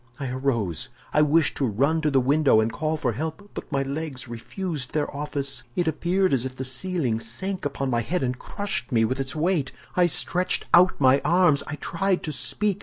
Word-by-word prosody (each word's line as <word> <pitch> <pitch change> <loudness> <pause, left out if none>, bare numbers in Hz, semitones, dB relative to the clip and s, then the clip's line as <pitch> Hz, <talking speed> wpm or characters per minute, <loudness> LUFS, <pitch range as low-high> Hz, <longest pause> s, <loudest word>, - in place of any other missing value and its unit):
I 135 -2 -3
arose. 120 - -1 0.2
I 150 - +4
wished 150 +1 +3
to 140 - +1
run 140 +9 +1
to 155 - +2
the 135 -2 +3
window 140 -2 +4
and 110 +1 0
call 155 +1 -1
for 130 -5 0
help, 160 - -5
but - - -8
my 135 -1 +1
legs 140 -1 -4
refused 140 - -4
their 150 -2 -1
office. 140 -1 -2
It 175 -2 0
appeared 175 +3 +1
as 125 -3 +2
if 130 -1 -5
the 130 - -5
ceiling 130 -3 -1
sank 180 - -4
upon 135 -2 -2
my 120 -1 +1
head 170 +6 -1
and 125 0 -2
crushed 205 -7 -3
me 115 -2 +3
with 130 +4 -2
its 135 +2 -3
weight. 155 -3 0 0.2
I 180 -1 +4
stretched 180 +2 +1
out 180 +2 +6
my 135 0 +5
arms. 175 -5 +4
I 145 - -4
tried 185 +4 -1
to 155 - -3
speak. 205 +7 +1
145 Hz, 205 wpm, -25 LUFS, 130-170 Hz, 0.2 s, out